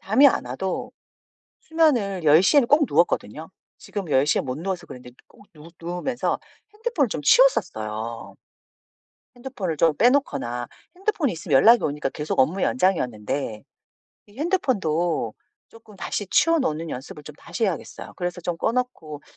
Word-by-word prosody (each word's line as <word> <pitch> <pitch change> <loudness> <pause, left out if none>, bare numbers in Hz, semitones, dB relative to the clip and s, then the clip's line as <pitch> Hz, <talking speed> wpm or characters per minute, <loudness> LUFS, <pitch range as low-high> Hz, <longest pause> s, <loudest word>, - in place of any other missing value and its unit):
잠이 235 +9 +5
안 275 - +2
와도 160 +10 -4 0.7
수면을 245 - +1
10:00 160 - +5
에는 275 - +5
꼭 295 0 +4
누웠거든요. 155 -2 0 0.3
지금 195 -6 -6
10:00 140 +2 +3
에 - - +2
못 130 +1 -5
누워서 185 +2 -4
그랬는데 125 -1 -12
꼭 205 - -21
누 155 +1 -13
누우면서 175 +9 -2 0.4
핸드폰을 425 - 0
좀 155 - -4
치웠었어요. 115 - +1 1.0
핸드폰을 240 - -5
좀 160 -1 +3
빼 245 - +5
놓거나 130 - -1 0.3
핸드폰이 365 - -1
있으면 160 -3 -1
연락이 230 - +6
오니까 145 -1 -2
계속 150 +3 -4
업무 165 +9 +2
연장이었는데 125 - -1 0.6
이 205 +4 -19
핸드폰도 175 - 0 0.3
쪼끔 220 -2 -17
다시 205 +1 -4
치워 330 +9 +3
놓는 165 - -2
연습을 140 +4 -8
좀 150 - -10
다시 175 +7 -4
해야겠어요. 190 -6 -5
그래서 175 -1 -4
좀 170 0 -3
꺼 225 - 0
놓고 200 - -4
175 Hz, 330 characters per minute, -23 LUFS, 150-245 Hz, 1.0 s, 연락이